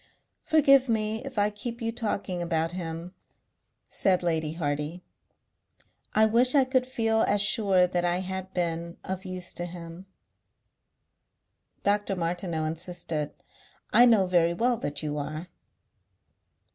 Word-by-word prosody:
"Forgive 275 Hz, -4 st, +4 dB
me 220 Hz, 0 st, -1 dB
if 270 Hz, -4 st, -8 dB
I 205 Hz, +1 st, +2 dB
keep 230 Hz, +3 st, -6 dB
you 230 Hz, -2 st, -2 dB
talking 205 Hz, -6 st, -3 dB
about 165 Hz, -1 st, -1 dB
him," 170 Hz, 0 st, -6 dB, 0.8 s
said 185 Hz, -2 st, +1 dB
Lady 160 Hz, -2 st, -1 dB
Hardy. 150 Hz, +2 st, -3 dB, 1.1 s
"I 220 Hz, -, +6 dB
wish 240 Hz, +5 st, +5 dB
I 275 Hz, -2 st, +5 dB
could 255 Hz, -1 st, +1 dB
feel 225 Hz, -3 st, +1 dB
as 205 Hz, -1 st, +2 dB
sure 200 Hz, -2 st, +4 dB
that 175 Hz, -1 st, -1 dB
I 175 Hz, +1 st, +1 dB
had 190 Hz, 0 st, -5 dB
been 170 Hz, -1 st, -3 dB
of 190 Hz, +1 st, -5 dB
use 185 Hz, -1 st, -5 dB
to 175 Hz, -, -3 dB
him." 170 Hz, +1 st, -10 dB, 1.8 s
Dr. 205 Hz, -1 st, +1 dB
Martineau 170 Hz, -1 st, -2 dB
insisted. 165 Hz, -2 st, -4 dB, 0.6 s
"I 245 Hz, +1 st, +8 dB
know 220 Hz, -5 st, +5 dB
very 170 Hz, -2 st, +2 dB
well 240 Hz, +4 st, +1 dB
that 145 Hz, -5 st, -4 dB
you 150 Hz, -1 st, -2 dB
are." 155 Hz, +4 st, -6 dB
185 Hz, 135 wpm, -27 LUFS, 170-220 Hz, 1.8 s, I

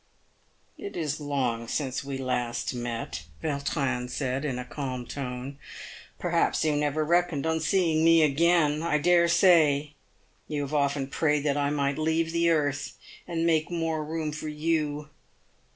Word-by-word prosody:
" -, -, -39 dB, 0.3 s
It 400 Hz, -, -7 dB
is 150 Hz, -2 st, -2 dB
long 130 Hz, -6 st, -2 dB
since 130 Hz, 0 st, -2 dB
we 140 Hz, -1 st, -4 dB
last 125 Hz, -2 st, -2 dB
met," 120 Hz, -10 st, -4 dB, 0.2 s
Yautrin 140 Hz, -4 st, -1 dB
said, 130 Hz, +1 st, -2 dB
in 130 Hz, -4 st, -2 dB
a 125 Hz, -, -5 dB
calm 130 Hz, -2 st, -5 dB
tone. 130 Hz, +1 st, -6 dB, 0.3 s
" -, -, -16 dB
Per -, -, -3 dB
haps -, -, +2 dB
you 155 Hz, -1 st, +2 dB
never 150 Hz, +1 st, 0 dB
reckoned 170 Hz, -2 st, +1 dB
on 160 Hz, 0 st, +1 dB
seeing 160 Hz, -1 st, +2 dB
me 165 Hz, -1 st, +6 dB
again. 155 Hz, 0 st, +3 dB
I 160 Hz, -2 st, +1 dB
dare 170 Hz, +2 st, +4 dB
say 155 Hz, -5 st, +4 dB, 0.5 s
you 150 Hz, -1 st, -2 dB
have 140 Hz, +1 st, -5 dB
often 140 Hz, -1 st, +1 dB
prayed 150 Hz, +1 st, 0 dB
I 145 Hz, -1 st, +1 dB
might 140 Hz, 0 st, 0 dB
leave 160 Hz, +1 st, +1 dB
the 170 Hz, 0 st, +2 dB
earth 145 Hz, -3 st, 0 dB, 0.3 s
and 165 Hz, -1 st, -1 dB
make 160 Hz, -2 st, +2 dB
more 165 Hz, -2 st, -1 dB
room 155 Hz, 0 st, -3 dB
for 155 Hz, +1 st, -6 dB
you. 150 Hz, -1 st, -1 dB
150 Hz, 160 wpm, -27 LUFS, 140-160 Hz, 0.5 s, me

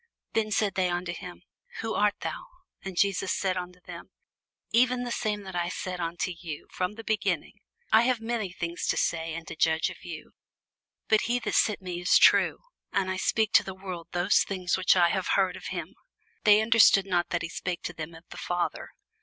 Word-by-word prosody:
Then 220 Hz, -1 st, +1 dB
said 210 Hz, -1 st, +1 dB
they 185 Hz, -1 st, +1 dB
unto 175 Hz, 0 st, -2 dB
him, -, -, -9 dB, 0.4 s
Who 225 Hz, -, -2 dB
art 205 Hz, 0 st, +1 dB
thou? -, -, -5 dB, 0.3 s
And 190 Hz, -2 st, -7 dB
Jesus 195 Hz, 0 st, +1 dB
saith 190 Hz, -2 st, 0 dB
unto 180 Hz, 0 st, -6 dB
them, -, -, -10 dB, 0.6 s
Even 250 Hz, +1 st, +3 dB
the 245 Hz, -, -4 dB
same 210 Hz, -3 st, -2 dB
that 190 Hz, -2 st, -8 dB
I 175 Hz, 0 st, 0 dB
said 185 Hz, 0 st, -4 dB
unto 170 Hz, +2 st, -2 dB
you 165 Hz, -3 st, -7 dB
from 180 Hz, +2 st, -2 dB
the 225 Hz, +1 st, -9 dB
beginning. 220 Hz, -1 st, -1 dB, 0.3 s
I 220 Hz, -, +7 dB
have 245 Hz, 0 st, +2 dB
many 225 Hz, -4 st, -3 dB
things 170 Hz, -1 st, -4 dB
to -, -, +1 dB
say 165 Hz, -1 st, -1 dB
and 165 Hz, -1 st, -7 dB
to -, -, -7 dB
judge 160 Hz, 0 st, +2 dB
of -, -, -14 dB
you: -, -, -8 dB, 0.8 s
but 220 Hz, -, +4 dB
he 240 Hz, -, +2 dB
that 225 Hz, -, -3 dB
sent 210 Hz, -3 st, +2 dB
me 180 Hz, -1 st, -4 dB
is 180 Hz, -, +5 dB
true; -, -, +5 dB, 0.3 s
and 190 Hz, -2 st, 0 dB
I 185 Hz, -, -2 dB
speak 220 Hz, +3 st, +1 dB
to -, -, +7 dB
the 190 Hz, -, -7 dB
world 185 Hz, -3 st, -7 dB
those 175 Hz, 0 st, +3 dB
things 185 Hz, -2 st, -1 dB
which 185 Hz, -1 st, +4 dB
I 175 Hz, -2 st, +5 dB
have 190 Hz, +1 st, -1 dB
heard 190 Hz, -2 st, +2 dB
of -, -, -10 dB
him. -, -, -5 dB, 0.5 s
They 210 Hz, 0 st, +7 dB
understood 220 Hz, -3 st, +6 dB
not 175 Hz, -3 st, 0 dB
that 170 Hz, -1 st, -1 dB
he 165 Hz, -, -4 dB
spake 180 Hz, 0 st, -4 dB
to 175 Hz, -, -4 dB
them 165 Hz, +1 st, -7 dB
of 165 Hz, -, -14 dB
the -, -, -9 dB
Father. 175 Hz, 0 st, -2 dB
185 Hz, 210 wpm, -28 LUFS, 175-210 Hz, 0.8 s, I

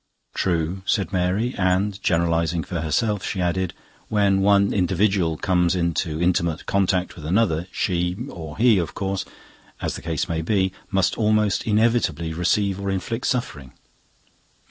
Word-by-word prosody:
"True," 85 Hz, +1 st, -1 dB
said 95 Hz, -3 st, 0 dB
Mary; 95 Hz, +7 st, 0 dB
and, 95 Hz, +2 st, +1 dB
generalising 85 Hz, -1 st, +1 dB
for 90 Hz, -4 st, -4 dB
herself, 95 Hz, +6 st, 0 dB
she 95 Hz, -, -3 dB
added, 90 Hz, 0 st, -1 dB, 0.3 s
"When 100 Hz, -2 st, +2 dB
one 100 Hz, 0 st, +4 dB
individual 95 Hz, -3 st, +1 dB
comes 90 Hz, 0 st, +1 dB
into 85 Hz, -2 st, -1 dB
intimate 85 Hz, 0 st, 0 dB
contact 95 Hz, -2 st, 0 dB
with 80 Hz, -, -10 dB
another, 85 Hz, -1 st, +1 dB
she 90 Hz, -2 st, -1 dB
or 80 Hz, -, -8 dB
he, 115 Hz, -4 st, +5 dB
of 85 Hz, -, -4 dB
course, 95 Hz, -1 st, -2 dB, 0.5 s
as -, -, -2 dB
the -, -, -7 dB
case 80 Hz, -2 st, -2 dB
may 80 Hz, -1 st, -2 dB
be 95 Hz, +1 st, +1 dB, 0.2 s
must 95 Hz, +1 st, +1 dB
almost 105 Hz, -2 st, +2 dB
inevitably 105 Hz, -8 st, +1 dB
receive 95 Hz, +3 st, +1 dB
or 100 Hz, 0 st, -3 dB
inflict 95 Hz, +6 st, -2 dB
suffering." 70 Hz, -, -3 dB
95 Hz, 145 wpm, -23 LUFS, 85-100 Hz, 0.5 s, he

